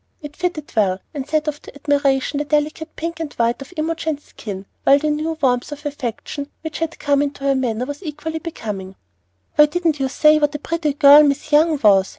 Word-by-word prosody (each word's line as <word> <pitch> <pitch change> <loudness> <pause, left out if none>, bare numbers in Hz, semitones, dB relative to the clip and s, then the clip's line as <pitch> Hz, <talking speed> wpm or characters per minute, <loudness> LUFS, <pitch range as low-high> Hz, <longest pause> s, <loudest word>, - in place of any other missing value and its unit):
It 295 -3 -9
fitted 355 -5 -3
well, 195 -4 +2
and 280 -2 -5
set 310 0 0
off 295 -1 -3
to - - -13
admiration 285 -1 +1
the - - 0
delicate 305 +2 -1
pink 335 +1 -4
and 320 -3 -4
white 235 +2 0
of 275 - -10
Imogen's 315 -1 -2
skin, 200 -3 -8 0.2
while 275 - +6
the 305 +1 0
new 310 +2 -2
warmth 250 -2 +1
of 295 +1 -8
affection 280 +1 -5
which 320 -1 -6
had 330 0 -3
come 285 -1 +2
into 285 -1 -3
her 275 0 +3
manner 250 -3 -1
was 285 +4 -7
equally 320 -1 -5
becoming. 205 - -6 0.6
"Why 300 0 +8
didn't 325 -1 0
you 265 -1 0
say 305 +3 +4
what 295 -1 +1
a - - 0
pretty 310 0 -2
girl 285 +1 +8
Miss 295 +1 0
Young 310 +1 +4
was?" 195 -2 +5
295 Hz, 205 wpm, -20 LUFS, 275-310 Hz, 0.6 s, Why